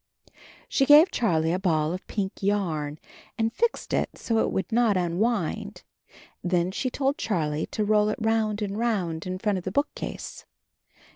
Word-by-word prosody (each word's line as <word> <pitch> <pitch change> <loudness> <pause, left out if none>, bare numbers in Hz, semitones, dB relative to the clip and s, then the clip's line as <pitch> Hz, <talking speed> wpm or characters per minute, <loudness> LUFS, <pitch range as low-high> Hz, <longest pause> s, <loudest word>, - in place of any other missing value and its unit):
She 270 - +1
gave 305 +5 +8
Charlie 165 -8 +1
a 185 - 0
ball 160 -4 +1
of 185 - -7
pink 200 -2 -3
yarn 165 -8 -1 0.4
and 225 0 0
fixed 470 -1 -1
it - - -1
so 230 - -3
that 225 - +3
it - - -2
would 190 - -2
not 225 -3 +3
unwind. 180 +2 -1 0.6
Then 175 0 +1
she 255 +6 -2
told 275 +4 -1
Charlie 155 - -1
to 215 - -2
roll 210 0 +3
it 215 - -2
round 220 -1 0
and 205 +1 -3
round 185 -9 -1
in 185 0 -3
front 205 -1 0
of - - -11
the 185 - -3
bookcase. 285 +8 -4
205 Hz, 170 wpm, -26 LUFS, 175-225 Hz, 0.6 s, gave